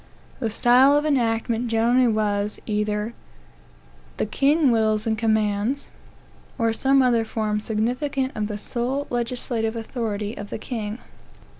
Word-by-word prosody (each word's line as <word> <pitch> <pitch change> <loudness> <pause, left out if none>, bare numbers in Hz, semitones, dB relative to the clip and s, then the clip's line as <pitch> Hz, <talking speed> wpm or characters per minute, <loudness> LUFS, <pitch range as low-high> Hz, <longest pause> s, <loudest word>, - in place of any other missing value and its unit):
The 230 -4 -1
style 250 +6 +5
of 295 - 0
enactment 235 -4 0
generally 235 +2 +3
was, 210 -2 0
either 210 +1 -1 1.0
"The - - 0
King 280 +5 +3
wills 220 -1 +1
and 220 -1 +1
commands," 220 +3 0 0.7
or 230 -1 +1
some 270 +3 +3
other 235 -3 +3
form 215 -1 -2
significant 250 +5 -1
of 210 -1 -1
the 210 -1 -4
sole 250 +6 -2
legislative 235 -2 -2
authority 220 -2 -3
of 205 0 -8
the - - -4
king. 220 -2 -5
225 Hz, 130 wpm, -23 LUFS, 215-250 Hz, 1.0 s, style